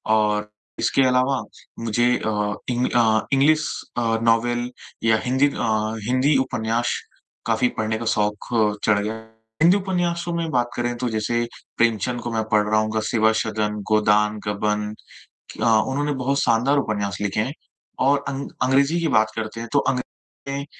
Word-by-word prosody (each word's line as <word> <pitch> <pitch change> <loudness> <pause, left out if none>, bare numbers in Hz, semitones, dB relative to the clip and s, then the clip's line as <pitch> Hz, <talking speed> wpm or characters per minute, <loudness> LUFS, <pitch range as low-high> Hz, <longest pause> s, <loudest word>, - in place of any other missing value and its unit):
और 105 -1 +1 0.3
इसके 135 - +2
अलावा 130 +1 +2 0.4
मुझे 115 +1 +1
अ, 105 -1 -1 0.2
इंग 125 +1 +1 0.5
इंग्लिश 150 +3 +4 0.3
अ, 120 - +1 0.2
नॉवेल 120 +2 +1 0.3
या 110 -1 +4
हिंदी 130 +3 +3
अ, 110 -3 -1
हिंदी 130 +3 +3
उपन्यास 115 0 -1 0.5
काफ़ी 115 +2 +2
पढ़ने 110 0 -1
का 115 - -5
शौक 105 0 0 0.5
चढ़ 105 -2 +3
गया। 105 +2 -2 0.5
हिंदी 175 +5 +6
उपन्यासों 175 -3 -1
में 165 -1 -2
बात 120 -1 +1
करें 120 0 -1
तो 125 0 -2
जैसे 115 +2 0 0.3
प्रेमचंद 115 +1 +1
को 120 - -4
मैं 110 -1 0
पढ़ 105 -1 +4
रहा 110 - +3
हूँ। 110 0 -2
ग 110 - +1
'सेवासदन', 110 -1 0
'गोदान', 105 0 +3
'गबन' 105 0 -1 0.6
क - - -8 0.3
उन्होंने 145 +2 -1
बहुत 140 +1 +1
शानदार 125 +5 +2
उपन्यास 105 -5 -2
लिखे 100 0 -1
हैं। 130 +5 -3 0.5
और 140 0 +3
अं 140 0 -4 0.2
अंग्रेजी 140 +6 +3
की 165 - +1
बात 110 0 +3
करते 110 0 -4
हैं 115 - -7
तो 145 - +5
अं - - +1
अंग्रेजी 125 - -4 0.5
में 140 - -5
115 Hz, 160 wpm, -22 LUFS, 110-135 Hz, 0.6 s, हिंदी